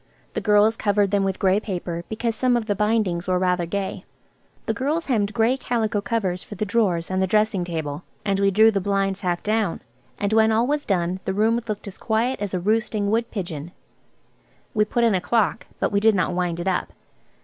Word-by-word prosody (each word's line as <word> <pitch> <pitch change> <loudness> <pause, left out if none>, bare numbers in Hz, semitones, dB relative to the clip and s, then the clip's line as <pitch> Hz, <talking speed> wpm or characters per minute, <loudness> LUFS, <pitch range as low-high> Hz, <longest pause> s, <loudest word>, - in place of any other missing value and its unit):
The - - -2
girls 210 +1 +4
covered 205 -1 +1
them 200 -1 +2
with 195 -1 -1
grey 190 +1 +3
paper, 175 -5 -4
because 225 +1 -1
some 245 +1 +2
of 230 - -2
the 210 - 0
bindings 210 -4 0
were 185 -1 +2
rather 180 -1 +1
gay. 195 +1 -3 0.6
The - - 0
girls 300 +5 -1
hemmed 215 -6 +1
grey 230 +3 +2
calico 225 -5 -1
covers 195 -5 -1
for 210 - -10
the 215 - -2
drawers 190 -6 0
and 185 0 0
the 190 - +2
dressing 210 -1 +2
table, 160 -3 -4 0.2
and 195 -1 +1
we 200 0 +4
drew 220 +3 +5
the 200 -2 -1
blinds 195 0 0
half 175 -2 -1
down, 215 -4 0 0.4
and 200 +1 -1
when 220 0 +5
all 225 +2 +3
was 290 +2 -1
done 180 -1 0
the 190 - -1
room 225 +3 +2
looked 210 -1 -4
as 195 - -9
quiet 230 +4 0
as 200 -2 -2
a - - 0
roosting 210 +1 0
wood 230 +1 +1
pigeon. 170 -6 -5 1.0
We 210 -3 +3
put 235 +3 0
in 230 -2 +4
a 185 - +1
clock, 215 -7 0
but - - 0
we 200 - +2
did 220 0 +4
not 180 -2 0
wind 175 -1 -1
it 175 - -3
up. 185 - -1
205 Hz, 215 wpm, -23 LUFS, 185-220 Hz, 1.0 s, drew